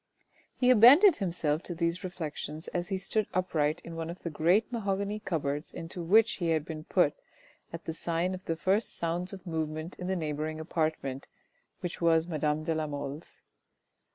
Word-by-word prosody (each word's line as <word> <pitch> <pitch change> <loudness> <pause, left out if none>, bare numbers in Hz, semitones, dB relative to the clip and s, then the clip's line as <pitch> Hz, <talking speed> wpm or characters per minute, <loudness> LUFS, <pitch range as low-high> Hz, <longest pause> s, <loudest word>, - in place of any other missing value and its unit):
He 250 0 +4
abandoned 280 - +8
himself 170 -5 -1
to 175 - -5
these 170 +1 -1
reflections 160 -3 -4
as 175 0 -2
he 190 - -1
stood 200 +2 -1
upright 165 -3 +1
in 170 - -8
one 165 0 -4
of 170 - -8
the 170 - -3
great 180 +10 +2
mahogany 200 -2 -1
cupboards 150 -6 -2
into 170 +1 -6
which 215 +7 +4
he 175 -3 -1
had 160 -2 +1
been 155 -1 -7
put - - +3 0.6
at 165 0 -8
the 160 - -3
sign 170 +2 -1
of 185 0 -8
the 165 - -1
first 195 +6 +1
sounds 170 +2 -1
of 195 -2 -10
movement 160 0 -4
in 180 - -4
the 190 - 0
neighbouring 155 -1 -3
apartment, 155 -4 -2 0.5
which 175 0 -5
was 165 -1 +3
madame 155 -2 0
de 165 - 0
la 155 -1 -1
Mole's. 145 +1 -7
170 Hz, 180 wpm, -30 LUFS, 155-185 Hz, 0.6 s, abandoned